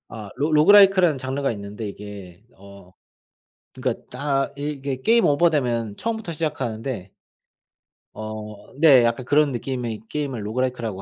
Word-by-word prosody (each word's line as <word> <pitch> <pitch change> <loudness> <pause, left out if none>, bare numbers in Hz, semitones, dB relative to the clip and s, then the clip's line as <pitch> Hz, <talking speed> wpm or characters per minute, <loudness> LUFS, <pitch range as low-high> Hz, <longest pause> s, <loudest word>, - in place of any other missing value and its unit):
아 105 -3 -8
로 150 +3 -1
로그라이크라는 185 -1 +6
장르가 135 +1 -2
있는데 100 +1 -7
이게 100 -2 -11
어 100 -1 -15 0.8
그니까 - - -2
딱 140 -2 -1
이게 140 -2 -4
게임 230 0 +4
오버되면 130 -9 +1
처음부터 220 -6 -3
시작하는데 125 - -4 1.1
어 110 -1 -8
네. 140 -7 +7
약간 115 +2 0
그런 145 0 +3
느낌의 120 -3 -4
게임을 135 -7 -4
로그라이크라고 115 -3 -3
130 Hz, 315 characters per minute, -23 LUFS, 110-150 Hz, 1.1 s, 네